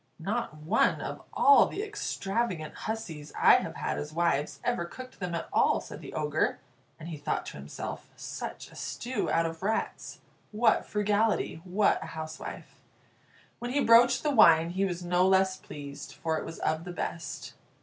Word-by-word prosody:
"Not 195 -1 -3
one 155 +1 +2
of - - -5
all 425 - +6
the 405 - -4
extravagant 230 - -2 0.2
hussies 165 -10 -5
I - - +8
have - - -4
had - - -2
as 150 - -5
wives 160 -3 0
ever 240 -7 0
cooked 255 +8 -10
them 180 -2 -3
at 165 - -4
all," - - +4
said - - -9
the - - -9
Ogre; 150 0 0 0.4
and 160 - -8
he 160 - -5
thought 145 - -2
to - - -7
himself, 70 +1 -7
"Such - - -7
a - - -15
stew 255 +2 -3
out 165 0 +2
of 165 0 -4
rats! 215 +3 -2 0.3
What 220 +1 +3
frugality! 210 -4 +1
What 200 +3 +2
a 160 - -6
housewife!" 155 0 -7 0.8
When 240 - -4
he 285 - +2
broached 235 +2 +6
the 300 - +2
wine, 165 - +6
he 190 +2 +1
was 175 -2 -3
no 180 +1 +3
less 190 0 +4
pleased, 140 -1 -9
for 160 -1 -1
it - - -6
was 165 - -7
of 160 +1 -1
the 180 0 -7
best. 165 -2 -5
180 Hz, 175 wpm, -29 LUFS, 160-220 Hz, 0.8 s, I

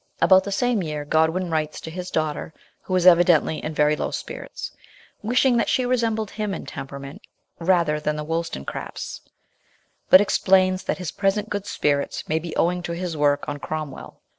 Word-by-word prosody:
About 190 0 +6
the 200 - -4
same 240 +1 +1
year 150 -3 -4
Godwin 160 +4 +1
writes 155 -1 -1
to 160 - -7
his 180 +2 -6
daughter 155 0 -2 0.3
who 185 - -3
is 180 -1 +2
evidently 170 -3 +5
in 155 0 -4
very 150 0 +3
low - - -2
spirits, - - -6 0.5
wishing 245 +3 +3
that - - +1
she 255 - +2
resembled 225 -4 0
him 210 -3 -3
in - - -7
temperament 140 +1 -8 0.4
rather 170 -3 +2
than 150 0 -1
the 150 - -4
Wollstonecrafts, 165 - -4 0.9
but 185 - +10
explains 185 -2 +3
that - - -1
his 180 -4 -4
present 205 +2 0
good 205 0 -3
spirits 145 -6 -1
may 160 +1 +1
be 165 0 -7
owing 180 +1 +1
to 170 -1 -4
his 175 -1 -4
work 145 -1 +1
on 145 0 -4
Cromwell. 155 0 -6
170 Hz, 175 wpm, -23 LUFS, 150-195 Hz, 0.9 s, but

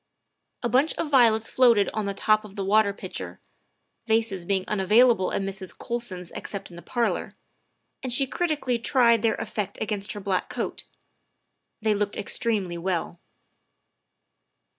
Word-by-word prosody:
A - - +2
bunch 265 +6 +2
of 305 - -3
violets 225 -4 +5
floated 235 -5 +4
on 215 -1 -2
the 200 0 -3
top 215 +1 +3
of 205 -2 -12
the 195 - -3
water 210 +1 +4
pitcher, 95 - -7 0.7
vases 220 -5 0
being 190 0 0
unavailable 210 +1 +4
at - - -1
Mrs. 195 -1 -5
Colson's 205 -8 -5
except 195 -2 -7
in - - -11
the 170 - -9
parlor, 240 +3 -1 0.7
and 255 - -4
she 270 +3 +3
critically 290 -5 -1
tried 235 -3 +3
their 225 - +2
effect 210 -2 -4
against 210 -1 -3
her 205 - -6
black 195 -2 -1
coat; - - -4 1.0
they 215 -1 +3
looked 205 0 -2
extremely 200 -5 -1
well. 175 -1 -2
210 Hz, 145 wpm, -25 LUFS, 195-235 Hz, 1.0 s, violets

